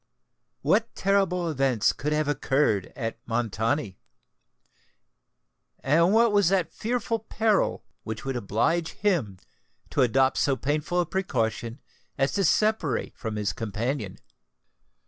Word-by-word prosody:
what 205 +10 +1
terrible 190 -3 +1
events 135 -7 +1
could 150 +2 -3
have 150 -1 +1
occurred 135 -9 +1
at 115 -3 -4
Montoni? 115 -1 -1 1.8
and 165 +6 +3
what 230 +1 +4
was 205 -4 +4
that 185 -3 0
fearful 230 0 -2
peril 220 -1 0 0.2
which 110 +2 -6
would 135 -1 -2
oblige 120 +10 0
him 155 - 0 0.5
to - - +1
adopt 130 +2 +3
so 140 - +2
painful 150 +6 -1
a - - -1
precaution 120 - -2 0.4
as 135 0 +1
to 195 - 0
separate 200 - +1
from 110 -1 -5
his 105 -1 -1
companion? 110 0 -3
145 Hz, 120 wpm, -26 LUFS, 115-185 Hz, 1.8 s, what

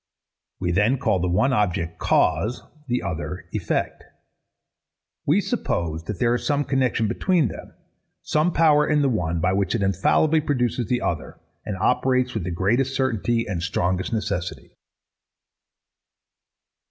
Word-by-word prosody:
We 90 -1 -1
then 105 +9 +2
call 105 -7 +1
the 90 - 0
one 130 +10 +2
object, 85 -7 -1
Cause; 100 +10 +1 0.2
the 125 0 -1
other, 90 -1 -4
Effect. - - -2 1.2
We - - +4
suppose 80 -1 -2
that 105 - -4
there 120 +4 +2
is 120 - -2
some 145 -1 +1
connexion 130 -5 +1
between 170 - +1
them; - - -10 0.5
some 155 +3 +1
power 150 -3 +4
in 150 -1 +2
the 140 - +3
one, 85 -8 -1
by 90 +3 +1
which 95 -3 0
it - - 0
infallibly 150 - +2
produces 125 -6 -1
the 125 -1 0
other, 85 -3 -3 0.3
and 100 -3 -3
operates 130 +4 +1
with 110 -6 -3
the - - -2
greatest 115 +10 0
certainty 120 -2 0
and 90 -5 -3
strongest 90 +2 -1
necessity. 100 -5 -3
110 Hz, 140 wpm, -23 LUFS, 90-130 Hz, 1.2 s, We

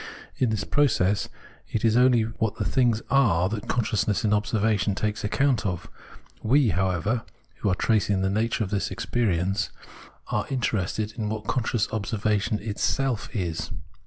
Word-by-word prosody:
In 125 - +2
this 110 -2 -1
process, 105 -8 +2 0.4
it 110 - -1
is 110 -1 +4
only 125 -2 +5
what 110 -1 -2
the - - -2
things 120 -4 +2
are 105 -11 +4
that 105 -1 -5
consciousness 110 -3 0
in 105 - +3
observation 105 -1 +1
takes 105 +1 -2
account 130 +3 +1
of; 90 -4 -4 0.5
we, 130 +2 +3
however, 95 +5 0 0.4
[who 105 - 0
are 95 - +2
tracing 100 -3 +1
the 95 - +2
nature 115 +3 0
of 95 - -5
this 100 -2 0
experi 100 0 0
ence] 90 -1 -1 0.6
are 105 - -1
interested 110 -4 -1
in 105 -1 -1
what 110 0 -4
conscious 115 -2 0
observation 105 -1 0
itself 115 +3 -1
is. 85 -5 -2
110 Hz, 155 wpm, -26 LUFS, 100-115 Hz, 0.6 s, only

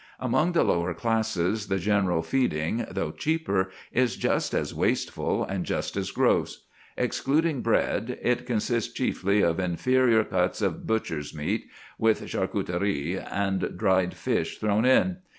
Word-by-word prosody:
Among 155 +8 +1
the 170 - +4
lower 85 0 0
classes 110 -1 0
the 95 - 0
general 95 -3 +1
feeding, 110 - 0
though 80 - -2
cheaper, 100 - 0 0.2
is 125 -1 +1
just - - 0
as - - -1
wasteful - - 0
and 95 -2 -3
just - - -3
as - - -2
gross. - - +1 0.3
Excluding 150 0 +1
bread, 115 +1 0
it 125 0 0
consists 115 0 0
chiefly 100 +2 +1
of 85 0 +2
inferior 115 +6 +3
cuts 90 -2 0
of 95 -5 -2
butcher's 80 -10 -2
meat 75 -1 -2 0.3
with 110 -1 +2
charcuterie 90 -2 -1
and 95 -1 -2
dried 95 -3 +2
fish - - -1
thrown 105 +2 +1
in. 175 +8 +4
105 Hz, 135 wpm, -26 LUFS, 90-120 Hz, 0.3 s, the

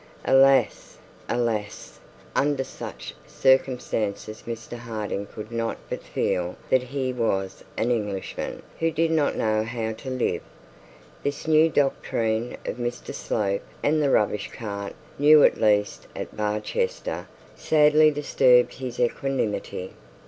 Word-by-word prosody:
Alas, 135 -2 +4 0.3
alas! 115 -4 -2 0.4
under 140 -1 +2
the - - -8 0.3
circumstances 125 -5 0
Mr 115 0 -6
Harding 110 -4 -4
could 105 +2 -9
not 115 -1 -2
but - - -3
feel 90 0 -1 0.2
that 130 - +5
he 130 0 -3
was 95 -6 -1
an 120 +2 +1
Englishman 105 -5 -3 0.2
who 165 - +2
did 165 +1 +1
not 155 -3 +2
know 110 0 +1
how 110 -1 -3
to 115 +4 -7
live. 130 -1 -1 0.8
This 145 +2 -3
new 160 +1 +5
doctrine 115 -5 0
of - - -3
Mr 120 0 -4
Slope 100 -2 -1 0.2
and 155 +1 +3
the 145 - +2
rubbish 105 -4 +1
cart, 100 -3 -6 0.2
new 150 +1 +7
at - - +4
least 105 -2 +2
at - - -6
Barchester, 470 - -2 0.3
sadly 155 0 +5
disturbed 130 -4 +4
his 130 -2 -6
equanimity. 115 -7 -1
120 Hz, 125 wpm, -25 LUFS, 110-140 Hz, 0.8 s, new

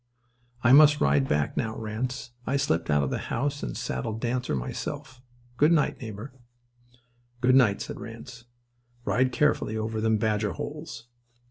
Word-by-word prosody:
I 125 - +5
must 150 +1 +8
ride 70 -1 +3
back 75 0 0
now, 110 -1 -2
Ranse. 120 +3 -4 0.2
I 140 - +1
slipped 85 - 0
out 75 -1 +3
of 70 - -2
the - - -1
house 145 +3 -1
and - - -4
saddled 105 - -3
Dancer 125 - -1
myself. 120 - -5 0.4
Good 150 +4 +5
night, 160 -4 +2
neighbour." 110 +3 -7 1.1
"Good 125 +1 +3
night," 120 -7 +4
said - - -7
Ranse. 115 +1 -10 0.6
"Ride 130 0 +2
carefully 125 -5 +1
over 110 0 -2
them 110 0 +2
badger 105 -2 0
holes." 150 - -7
115 Hz, 150 wpm, -27 LUFS, 105-130 Hz, 1.1 s, must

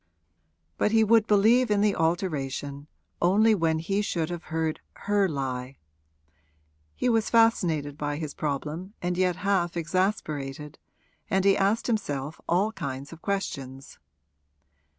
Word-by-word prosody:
But 210 - +2
he 220 0 +5
would 220 0 +4
believe 225 +4 +4
in 205 -1 +2
the 210 -1 +2
alteration 145 -4 -2 0.3
only 210 +6 +4
when 165 -5 +1
he 195 +6 -1
should 170 -5 -2
have 175 -1 -6
heard 160 0 -2 0.2
her 205 -2 +1
lie. 130 -2 -4 1.2
He - - -1
was 225 -2 +2
fascinated 165 -11 +2
by 145 0 -2
his 150 -1 -5
problem 155 +7 -4
and 180 0 -2
yet 180 -1 +1
half 185 -3 0
exasperated, 155 -5 -2 0.5
and 190 0 +1
he 195 -1 +5
asked 200 +3 +1
himself 150 - -2
all 195 +5 +2
kinds 140 -6 -6
of 165 - -13
questions. 135 -10 -4
175 Hz, 130 wpm, -27 LUFS, 145-205 Hz, 1.2 s, he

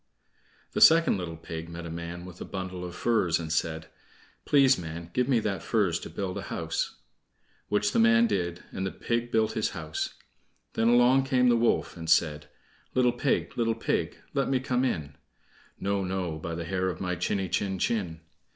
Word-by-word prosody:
The - - -2
second 165 - +7
little 80 -2 -5
pig 80 +1 -7
met 85 0 -7
a 85 - -6
man 85 +1 -6
with 90 -1 -11
a - - -2
bundle 95 -2 -5
of 90 -1 -6
furze 95 -8 +2
and 80 -1 -3
said: 80 -1 -1 0.6
"Please, 135 -2 +5
man, 85 -1 -7
give 125 0 +1
me 125 -4 +4
that 100 -2 -2
furze 100 -8 +1
to - - -8
build 95 -2 -4
a - - -8
house." - - -2 0.7
Which 105 0 +1
the - - +1
man 115 +1 +6
did, 90 -6 -2
and 95 - -4
the 95 - -2
pig 120 0 -2
built 110 -1 +2
his 110 - 0
house. 80 -1 -4 0.6
Then 115 - +1
along 125 +3 +5
came 125 -1 +3
the 120 - +5
wolf, 115 0 +1
and 80 -1 -6
said: 75 -2 +2 0.5
"Little 125 -1 +4
pig, 125 +2 0
little 115 -1 +2
pig, 115 - -1 0.2
let 140 -1 0
me 135 -1 +2
come 125 0 0
in." 75 - -2 0.6
"No, 100 0 0
no, 90 -4 -3
by 85 +1 -4
the 85 0 -4
hair 95 +1 -1
of 85 - -5
my 90 -1 -2
chiny 95 +2 -1
chin 95 +2 -1
chin." 90 -5 -1
95 Hz, 190 wpm, -28 LUFS, 85-115 Hz, 0.7 s, second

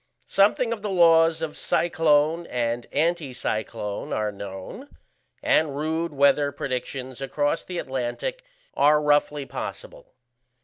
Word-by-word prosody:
Something 220 +4 +2
of 220 - -7
the 210 - -3
laws 165 -3 +4
of 155 -2 -4
cyclone 160 0 +2
and 120 -1 -2
anticyclone 125 -9 -2
are 105 -1 -1
known, 100 - -8 0.5
and 150 -3 +2
rude 160 +2 -1
weather 140 0 +3
predictions 130 -1 -5
across 145 +3 -1
the 180 - -6
Atlantic 135 - -3 0.3
are 150 +1 +4
roughly 150 -1 +1
possible. - - -8
150 Hz, 115 wpm, -25 LUFS, 130-165 Hz, 0.5 s, laws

